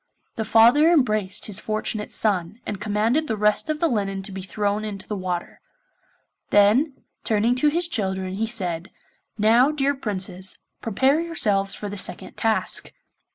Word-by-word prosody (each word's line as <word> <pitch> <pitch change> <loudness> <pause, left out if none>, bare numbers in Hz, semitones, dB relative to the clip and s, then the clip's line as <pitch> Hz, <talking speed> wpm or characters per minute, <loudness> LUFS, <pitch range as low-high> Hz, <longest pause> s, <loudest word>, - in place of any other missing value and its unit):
The 220 - -3
father 235 +9 +6
embraced 215 - +1
his 205 -3 -3
fortunate 215 0 -3
son, 200 -1 0
and 200 -2 -5
commanded 220 +9 +1
the 220 - -2
rest 210 +8 +1
of 305 -1 -1
the 335 - +2
linen 195 -6 -2
to 195 - -8
be 190 0 -6
thrown 205 +2 -2
into 205 -3 -6
the 210 - -3
water; 180 -2 -4 0.9
then, 220 +9 +4 0.3
turning 220 +2 +2
to 300 - +3
his 335 +3 +2
children 190 - -2
he 220 +3 -1
said, 180 -6 -3 0.5
'Now, 230 +5 +5
dear 285 -2 +1
Princes, 190 -7 -3 0.2
prepare 265 +7 +2
yourselves 210 -13 0
for 210 - -6
the 205 0 -6
second - - -2
task. 225 -1 -1
215 Hz, 155 wpm, -23 LUFS, 195-245 Hz, 0.9 s, father